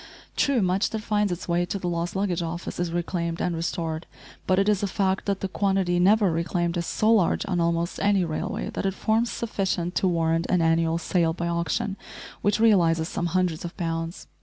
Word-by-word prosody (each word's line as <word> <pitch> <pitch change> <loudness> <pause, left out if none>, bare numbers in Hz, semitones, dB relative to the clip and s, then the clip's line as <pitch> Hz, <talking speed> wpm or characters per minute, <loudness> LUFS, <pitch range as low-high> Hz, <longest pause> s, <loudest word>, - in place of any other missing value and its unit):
True, 270 -7 +2
much 185 +4 +1
that 220 - -4
finds 210 -3 +1
its 175 - -5
way 175 0 +1
to 200 - -2
the 180 - -4
lost 170 +1 -2
luggage 190 -3 0
office 170 +1 -5
is 175 -1 -1
reclaimed 170 -1 -2
and 175 - -1
restored, 165 -1 -3 0.4
but 185 - +3
it 195 +1 +2
is 210 -2 +2
a 200 - 0
fact 190 0 -1
that 200 -1 -1
the 195 - -1
quantity 190 -2 +1
never 200 +1 +4
reclaimed 170 +1 -1
is 170 -1 -2
so 215 +1 +2
large 200 -6 +2
on 180 -2 -1
almost 170 +1 0
any 200 -2 +3
railway 155 -2 -3
that - - -2
it 195 - -2
forms 225 +3 +1
sufficient 190 -6 -2
to 190 - +1
warrant 165 -1 +1
an 180 - +3
annual 165 0 +2
sale 170 -1 +1
by 170 0 -3
auction 170 +5 -1 0.4
which 205 +1 +1
realises 170 -8 +4
some 175 - -2
hundreds 175 -2 0
of 170 - -7
pounds. 165 0 -3
175 Hz, 205 wpm, -25 LUFS, 170-195 Hz, 0.4 s, never